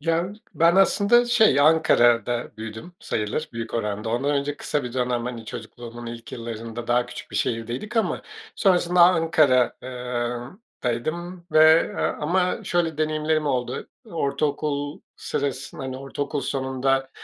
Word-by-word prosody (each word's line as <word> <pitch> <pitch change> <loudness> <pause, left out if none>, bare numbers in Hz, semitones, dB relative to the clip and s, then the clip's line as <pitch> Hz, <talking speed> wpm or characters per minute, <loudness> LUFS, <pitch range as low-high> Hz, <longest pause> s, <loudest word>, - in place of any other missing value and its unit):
Ya, 165 +5 0 0.2
ben 170 +2 +4
aslında, 200 +5 +5
şey, 220 - +4
Ankara'da 120 -7 +3
büyüdüm 110 +9 -8
sayılır 110 +9 -2
büyük 115 0 -5
oranda. 105 0 -2
Ondan 125 +5 0
önce 145 0 -1
kısa 145 -3 -2
bir 120 - -5
dönem, 125 -2 -1
hani, 120 -2 -5
çocukluğumun 115 +2 -8
ilk 115 0 -8
yıllarında 115 0 -6
daha 120 0 +2
küçük - - -9
bir - - -4
şehirdeydik 120 - -2
ama 185 -8 0 0.3
sonrasında 180 -2 +3
Ankara 160 -8 +4
ııı, 125 +3 -4 0.2
daydım 170 +9 -3
ve, 155 +1 +6
ııı, - - -1
ama 180 +4 0
şöyle 165 -3 0
deneyimlerim 155 0 0
oldu, 125 -2 -2 0.2
ortaokul 145 -4 -2 0.2
sırasında, 140 -1 -4
hani, 130 -1 -4
ortaokul 140 +2 -4
sonunda 135 0 0
135 Hz, 130 wpm, -24 LUFS, 120-160 Hz, 0.3 s, ve